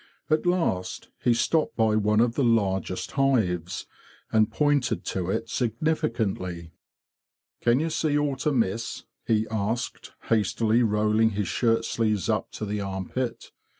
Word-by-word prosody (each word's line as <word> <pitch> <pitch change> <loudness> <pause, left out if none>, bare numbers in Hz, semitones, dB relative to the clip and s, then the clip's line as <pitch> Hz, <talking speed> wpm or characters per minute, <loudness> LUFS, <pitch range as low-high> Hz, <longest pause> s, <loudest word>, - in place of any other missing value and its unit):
At 155 +3 +2
last 165 - -1
he 120 -2 +4
stopped 160 +6 +1
by 110 -2 +2
one 105 +1 +3
of 120 -1 +2
the 140 - 0
largest 95 -5 0
hives, 105 - 0 0.5
and 110 -1 +3
pointed 145 -4 +1
to 90 -1 -2
it 115 - -1
significantly. 115 - -1 0.9
"Can 120 +2 +3
ye 160 +2 0
see 155 -2 +1
aught 145 -1 -1
amiss?" 115 -5 0 0.2
he 110 -1 +2
asked, 110 +3 -3
hastily 110 +1 +2
rolling 110 0 +2
his 105 -3 0
shirt 115 -1 +1
sleeves 110 -5 0
up - - 0
to 110 - -4
the 105 0 -2
armpit. 100 +6 -4
115 Hz, 135 wpm, -26 LUFS, 105-125 Hz, 0.9 s, he